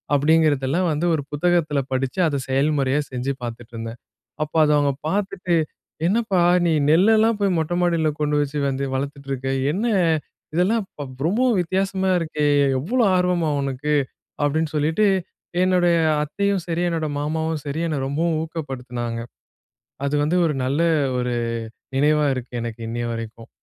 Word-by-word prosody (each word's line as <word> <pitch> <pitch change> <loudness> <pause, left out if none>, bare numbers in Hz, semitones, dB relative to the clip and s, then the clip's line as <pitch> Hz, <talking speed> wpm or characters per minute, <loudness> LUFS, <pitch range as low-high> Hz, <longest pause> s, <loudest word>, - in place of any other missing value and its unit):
அப்படீங்கிறதெல்லாம் 155 +2 +2
வந்து 155 +3 -1
ஒரு 150 -3 0
புத்தகத்தில 155 -1 +1
படிச்சு, 130 +5 -1
அத 145 -3 -1
செயல்முறையா 140 0 +2
செஞ்சு 130 +2 -2
பார்த்துட்ருந்தேன். 115 0 -7 0.4
அப்ப 155 - -8
அத 150 - +3
அவங்க 145 -1 +2 0.2
பார்த்துட்டு, 185 -2 -1 0.5
"என்னப்பா 200 -2 +1 0.3
நீ 165 - +3 0.2
நெல்லெல்லாம் 220 +5 +4
போய் 195 -3 +2
மொட்டை 160 +2 -1
மாடில 165 -3 +2
கொண்டு 150 0 +1
வச்சு 145 +1 -2
வந்து 135 +1 -2
வளர்த்துட்ருக்க. 140 -1 -4 0.3
என்ன 200 +6 -2 0.7
இதெல்லாம் 205 +6 +2
இப்ப 135 -6 -8
ரொம்பவும் 235 +4 +2
வித்தியாசமா 190 +2 0
இருக்கே. 155 -2 -2 0.4
இவ்வளோ 235 - +1
ஆர்வமா 180 -3 +1
உனக்கு?" 140 +2 -1 0.5
அப்படீன்னு 155 +1 0
சொல்லீட்டு 160 +8 +2 0.6
என்னுடைய 180 -2 +3 0.3
அத்தையும் 200 +6 0
சரி, 170 0 -1
என்னோட 165 -2 -1
மாமாவும் 160 +1 -1
சரி 145 +3 -3
என்ன 155 -3 -1
ரொம்பவும் 160 +4 0
ஊக்கப்படுத்தினாங்க. 125 -7 -5 0.9
அது 145 - -1
வந்து 160 +4 +1
ஒரு 150 - 0
நல்ல 140 +5 0 0.4
ஒரு 125 0 -1 0.6
நினைவா 150 +2 +3
இருக்கு 125 -1 -7
எனக்கு, 115 0 -6
இன்னைய 120 +1 -3
வரைக்கும். 115 0 -7
150 Hz, 135 wpm, -22 LUFS, 135-175 Hz, 0.9 s, நெல்லெல்லாம்